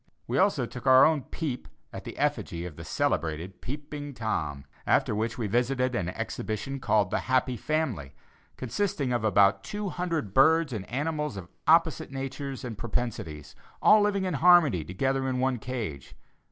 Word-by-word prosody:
We - - 0
also 190 -10 +3
took 125 +2 -8
our 130 0 +8
own 155 -3 +2
"peep" 140 -7 -4 0.3
at - - -8
the - - -8
effigy 85 +1 -1
of 85 -4 -7
the - - -9
celebrated 80 +4 -2
"Peeping 145 +1 -6
Tom," 75 - -3 0.2
after - - +3
which 110 +2 -2
we 115 - -2
visited 125 +4 +1
an 90 -8 -1
exhibition 110 +8 -4
called 105 -5 +2
the - - +1
"Happy 130 -1 +2
Family," 120 - -2 0.4
consisting 135 - -1
of 120 - 0
about 100 -2 +4
two 205 -1 -4
hundred 170 - -3
birds 160 +2 +4
and 100 -4 -5
animals 150 -2 -2
of 90 -2 -8 0.2
opposite 165 -1 +4
natures 135 0 -5
and 115 -4 -6
propensities, 90 -11 -4 0.2
all 215 0 +6
living 205 -2 +1
in 185 - -1
harmony 155 - +5
together 130 - -1
in 130 - -1
one 130 -1 +1
cage. 110 - -5
125 Hz, 165 wpm, -28 LUFS, 105-150 Hz, 0.4 s, our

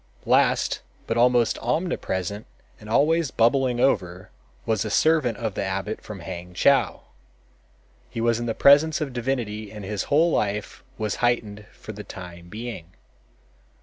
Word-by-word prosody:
Last, - - +2 0.2
but 115 - -2
almost 120 -1 +3
omnipresent 110 - -2 0.3
and 105 - -12
always 155 +6 +3
bubbling 125 +1 +2
over, 90 -7 0 0.3
was 110 -2 0
a 110 - -4
servant 140 -2 +2
of 110 -3 -3
the - - -2
abbot 100 +3 -3
from 105 -4 -9
Hangchow. 90 +9 +1 1.1
He - - -6
was 115 0 +2
in 120 - -3
the 115 - -1
presence 155 +4 +5
of 145 -5 -3
divinity 115 -4 -3
and 105 -2 -8
his 105 0 -3
whole 160 +4 +3
life 105 +3 -2
was 110 -2 -2
heightened 110 -4 -1
for - - -10
the 105 0 -8
time 90 -3 -10
being. 105 -5 -7
110 Hz, 145 wpm, -24 LUFS, 100-125 Hz, 1.1 s, presence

